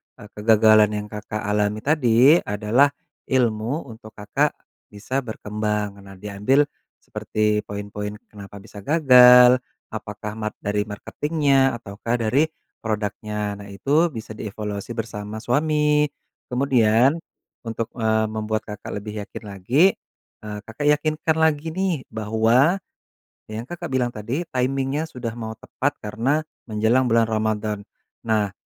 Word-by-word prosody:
eee, 110 -4 -12
kegagalan 110 0 +5
yang - - -10
Kakak 105 0 -5
alami 105 0 0
tadi 140 +1 +5
adalah 105 +7 +2 0.4
ilmu 125 +2 0
untuk 110 -1 -13
Kakak 105 -1 0 0.3
bisa 105 +6 -3
berkembang 105 -2 -3
nah 100 0 -13
diambil 105 +8 +1 0.4
seperti 105 0 -1
poin-poin 105 0 -5 0.2
kenapa 100 -1 -11
bisa 105 -1 -11
gagal, 125 -2 +7 0.3
apakah 105 -1 -6
mat 110 -1 -3
dari 105 +1 -1
marketing-nya 135 +4 +1
ataukah 105 +4 -3
dari 130 +8 +2 0.4
produknya 105 -1 -3
nah 100 - -10
itu 145 - +1
bisa 110 -2 -7
dievaluasi 105 +1 -5
bersama 110 -2 -5
suami, 150 +3 +2 0.5
kemudian 125 +1 +3 0.5
untuk, 115 0 -3
eee, 110 -1 +1
membuat 110 0 -2
Kakak 105 0 -7
lebih 105 +1 -7
yakin - - -9
lagi, 100 - +1 0.6
eee, 105 -1 -5
Kakak 115 +6 -5
yakinkan 155 +1 0
lagi 160 0 +1
nih 190 0 0 0.2
bahwa 110 - +3 0.7
yang 110 +2 -5
Kakak 175 +7 -7
bilang 125 -2 0
tadi 120 +10 -3
timing-nya 135 +4 -1
sudah 125 -6 -5
mau 110 -1 -6
tepat 135 +5 -3
karena 130 +9 0 0.2
menjelang 110 +4 +2
bulan 115 0 +4
Ramadhan 110 -1 -1 0.5
nah. 105 -3 +1
110 Hz, 125 wpm, -23 LUFS, 105-135 Hz, 0.7 s, gagal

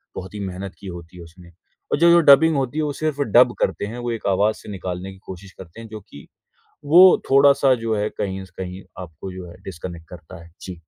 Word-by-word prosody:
बहुत 95 +2 -8
ही 105 - -7
मेहनत 95 0 -6
की 100 - -11
होती 85 0 -10
है 85 - -10
उसने 85 +1 -16 0.4
और - - +1
जो 170 0 +5
जो 170 - +6
डबिंग 155 +2 +6
होती 135 +2 -2
है 155 - 0
वो 145 -1 -2
सिर्फ 155 -1 -3
डब 125 -2 +4
करते - - -1
हैं, 115 +4 -7
वो 120 0 -4
एक 115 - -6
आवाज़ 100 +3 +1
से - - -13
निकालने 90 0 -6
की 95 - -15
कोशिश 95 +1 -10
करते 95 +4 -12
हैं 115 - -10
जो 110 0 -9
कि 70 - -13 0.6
वो 180 +5 +7
थोड़ा-सा 140 0 +5
जो 110 -1 0
है 105 +1 -1
कहीं 95 -1 -4
से 90 - -22
कहीं 90 +1 -9 0.2
आपको 90 +3 -10
जो 90 -1 -9
है 85 - -13
डिस्कनेक्ट 85 -2 -9
करता 85 0 -12
है। 85 - -18
जी। 90 - -8
95 Hz, 235 wpm, -21 LUFS, 90-130 Hz, 0.6 s, वो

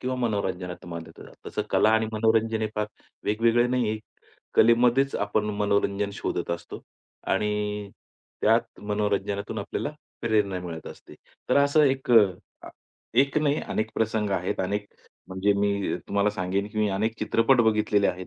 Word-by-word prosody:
किंवा 130 0 -2
मनोरंजनाच्या 95 -7 -3
माध्यमातन 80 -1 -9
तसं - - -2
कला 110 - +4
आणि 110 0 +3
मनोरंजन 110 0 +2
हे - - +1
फार 105 0 -1 0.4
वेगवेगळे 115 +3 +3
नाही 125 -2 +1
आहे. 110 - -2 0.6
कलेमध्येच 120 +4 +4
आपण 105 +1 0 0.2
मनोरंजन 100 0 +1
शोधत 85 -3 -3
असतो 85 0 -5 0.5
आणि 105 0 -1 0.5
त्यात - - +2
मनोरंजनातून 105 0 -1
आपल्याला 100 +7 -3 0.3
प्रेरणा 105 -5 +1
मिळत 85 -3 -7
असते. - - -11 0.3
तर - - +3
असं 145 +2 +4
एक, 135 -2 0
अ, 115 -4 +8 0.4
आ - - -9 0.5
एक 140 +2 -1
नाही 150 0 +1
अनेक 110 0 -1
प्रसंग 110 -2 0
आहेत 90 -2 -1
अनेक, 105 +2 -2 0.4
म्हणजे 95 +2 +1
मी 100 -1 0
तुम्हाला 100 +1 +2
सांगेन 95 +1 -2
की 110 0 -6
मी 105 -1 +2
अनेक 110 +4 -1
चित्रपट 115 +4 +3
बघितलेले 105 -1 +2
आहेत, 90 0 -4
105 Hz, 150 wpm, -26 LUFS, 100-115 Hz, 0.6 s, अ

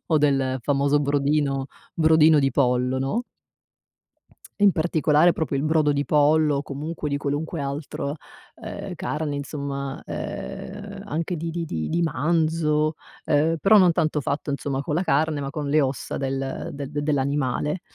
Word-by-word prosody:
o 160 -3 +3
del 135 -3 +1
famoso 140 +2 +2
brodino 140 -1 +1 0.3
brodino 160 -1 +5
di 135 -1 +2
pollo, 125 0 +1
no. 135 - -1 1.4
In 205 -1 +6
particolare 160 0 +3
proprio 155 -3 -2
il 135 - 0
brodo 155 0 +2
di 145 0 0
pollo, 150 +2 +3
o - - -1
comunque 150 +2 -5
di 140 - 0
qualunque 145 +3 -3
altro, 140 0 -4 0.4
uhm, - - -7
carne 150 -1 -3
insomma, 140 -1 -4
uhm, 200 0 -6
anche 165 -1 -2
di 165 +1 -4
di 170 +1 -3
di 80 - -3
di 170 - 0
manzo 155 0 +1 0.3
uhm 155 +3 +2
però 215 +2 +6
non 185 -3 +6
tanto 155 -2 0
fatto 140 +2 -3
insomma 140 -1 -2
con 150 +1 -2
la 180 - +1
carne, 150 -2 +1
ma 135 - -3
con 150 -2 -4
le 155 +2 +4
ossa 135 -1 -2
del 135 0 -3
de 140 -1 -5
dell'animale. 145 +1 -1
150 Hz, 155 wpm, -24 LUFS, 140-160 Hz, 1.4 s, In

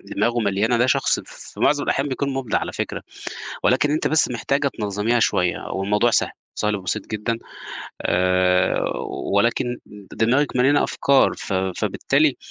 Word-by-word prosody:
دماغه 120 0 +1
مليانة 105 +3 +1
ده، 120 - +3
شخص - - +2
في - - -12
معظم 145 -1 +3
الأحيان 135 +2 0
بيكون 140 +1 -2
مُبدع 135 -3 -1
على - - -4
فكرة، - - -4 0.6
ولكن 130 +3 +3
أنتِ 155 +1 +1
بس 160 - +3
محتاجة 140 +5 0
تنظّميها 105 +3 0
شوية 90 -4 +1
والموضوع 105 +5 +1
سهل، - - +2 0.2
سهل 105 0 0
وبسيط 95 -3 -3
جدًا، 110 +2 -2 0.6
آآ 90 0 +2 0.5
ولكن 120 +4 +1 0.4
دماغِك 130 +5 +1
مليانة 135 +3 +4
أفكار، 140 -1 +3
ف - - -6
فبالتالي 95 -1 +1
115 Hz, 140 wpm, -22 LUFS, 100-130 Hz, 0.6 s, مليانة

